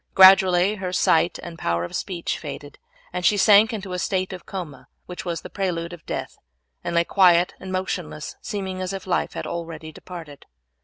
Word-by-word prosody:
Gradually 190 +1 +7
her 185 -2 -4
sight 175 -1 +3
and 170 -1 -8
power 85 0 0
of 85 - -6
speech 175 -4 -3
faded, 145 -2 -8 0.3
and 180 0 -3
she 205 +3 +4
sank 210 +2 +6
into 210 -3 -5
the 180 0 -3
state 185 0 -1
of 180 - -9
coma 170 -9 -7 0.2
which 180 0 -7
was 170 -2 -3
the - - -9
prelude 175 -3 -2
of 175 - -11
death, - - -5 0.4
and 170 - -3
lay 170 - +4
quiet 180 -1 +4
and 190 - -7
motionless, 180 -4 -4
seeming 190 -4 -4
as 185 +1 -3
if 195 -1 -6
life 180 -2 0
had - - -5
already 165 -2 -6
departed. 160 -4 -10
180 Hz, 190 wpm, -23 LUFS, 170-190 Hz, 0.4 s, Gradually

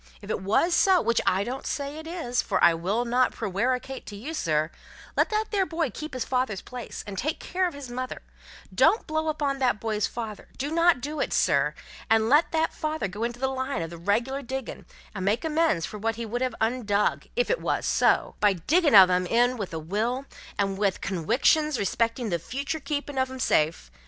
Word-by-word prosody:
If 205 +1 -7
it - - -1
wos 220 - +2
so, 375 +1 +5
which 235 -7 +1
I 190 +2 +3
still 240 +4 -3
don't 270 - -7
say 285 +1 -3
it 315 - -9
is 325 -8 -1
(for - - -1
I 170 - +7
will 195 +9 -1
not 250 +2 +2
prewaricate 250 +7 -2
to 205 - -7
you, 260 +11 -6
sir), 155 - 0 0.4
let - - +3
that 430 0 -1
there 390 -3 +1
boy 325 -5 -1
keep 305 +4 -7
his 255 - -2
father's 250 -7 -1
place, 250 -2 -7
and 200 -3 -5
take 310 +4 -2
care 370 0 0
of 340 - -6
his 275 -4 -8
mother; 255 +1 -5 0.5
don't 445 - +4
blow 315 0 -1
upon 290 -3 -1
that 245 -5 +1
boy's 215 -2 -1
father 220 -3 -6
do 285 +3 -3
not 335 -4 +4
do 300 +3 -4
it, - - -1
sir - - +2 0.3
and 225 0 +3
let 295 +5 +4
that 320 0 +1
father 310 -7 -2
go 205 +4 -5
into 240 +1 -3
the 265 - +1
line 265 -6 -2
of 165 - -6
the 170 - -8
reg'lar 235 +10 0
diggin', 265 0 -6 0.3
and 195 -3 -4
make 210 +9 +1
amends 315 - +1
for 210 - -8
what 225 +2 -1
he 230 0 -5
would 240 +3 -3
have 255 -3 -1
undug 220 -3 0
if - - +1
it - - 0
wos - - -1
so - - +2
by 205 -1 +4
diggin' 295 - +2
of 190 -2 +10
'em 180 0 +1
in 245 +5 +3
with 205 -6 -5
a 165 - -4
will, 220 - -2 0.3
and 195 -1 -1
with 200 -2 +1
conwictions 255 - +2
respectin' 230 +3 0
the 170 - 0
futur' 280 - -4
keepin' 290 -2 -3
of 260 0 +1
'em 260 0 -8
safe. 155 - +1
245 Hz, 215 wpm, -26 LUFS, 205-290 Hz, 0.5 s, of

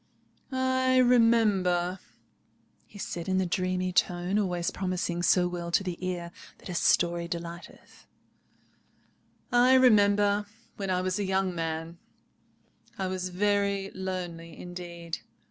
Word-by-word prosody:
"I 260 0 +2
remember," 210 -8 +3 0.9
he - - -14
said 175 -3 -5
in 185 - +2
the 190 - +1
dreamy 185 +1 -1
tone 180 +3 +1
always 180 -4 -1
promising 180 -2 -2
so 180 0 +3
well 175 -1 -5
to 175 +3 +2
the 180 -1 -5
ear 175 -2 -3 0.3
that - - -12
a - - -4
story 170 0 +2
delighteth—"I 175 +8 -4
remember, 205 -4 +4 0.3
when 195 -2 -4
I 180 0 +1
was 185 +1 -1
a - - 0
young 190 -1 0
man, 165 0 -4 1.0
I 190 - -2
was 185 0 -3
very 200 +1 0
lonely 175 -3 -5
indeed. 175 -2 -7
185 Hz, 120 wpm, -28 LUFS, 175-200 Hz, 1.0 s, remember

